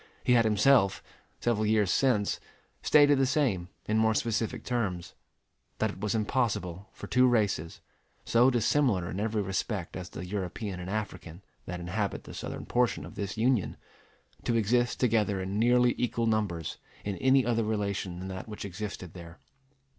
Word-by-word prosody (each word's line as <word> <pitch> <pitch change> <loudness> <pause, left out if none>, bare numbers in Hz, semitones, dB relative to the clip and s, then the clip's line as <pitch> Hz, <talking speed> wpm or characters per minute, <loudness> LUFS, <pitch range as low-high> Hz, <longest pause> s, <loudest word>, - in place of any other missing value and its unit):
He 125 - +3
had 115 -2 +5
himself, 110 -1 +4 0.4
several 115 -3 +1
years 105 -3 +3
since, 120 -7 +2 0.4
stated 145 -2 +5
the 135 - +3
same 125 - 0 0.2
in 110 +1 +2
more 110 0 +3
specific 115 0 -1
terms: 100 -9 -2 0.6
that - - 0
it - - -12
was 105 +1 -1
impossible 105 -5 -1
for - - -9
two 125 0 +4
races, 105 -9 0 0.4
so 120 +3 +5
dissimilar 120 -6 +1
in 95 - -4
every 110 0 0
respect 95 -1 -3
as 95 -1 -6
the 90 - -7
European 95 0 -4
and 90 +1 -6
African 100 -4 -5 0.2
that 90 0 -4
inhabit 100 +4 -3
the - - -10
southern - - -6
portion 125 -1 +1
of - - -10
this 100 +1 -5
Union, 120 -3 +1 0.7
to 120 - 0
exist 120 +2 +1
together 105 -5 +2
in 95 +2 -3
nearly 120 +1 +4
equal 120 -1 0
numbers 105 -8 -1 0.3
in 100 -1 -2
any 130 +3 +4
other 115 -1 +1
relation 100 -4 -2
than 95 +1 -6
that 95 +2 -6
which 105 -2 -7
existed 95 -2 -6
there. 85 -1 -11
105 Hz, 160 wpm, -29 LUFS, 95-120 Hz, 0.7 s, had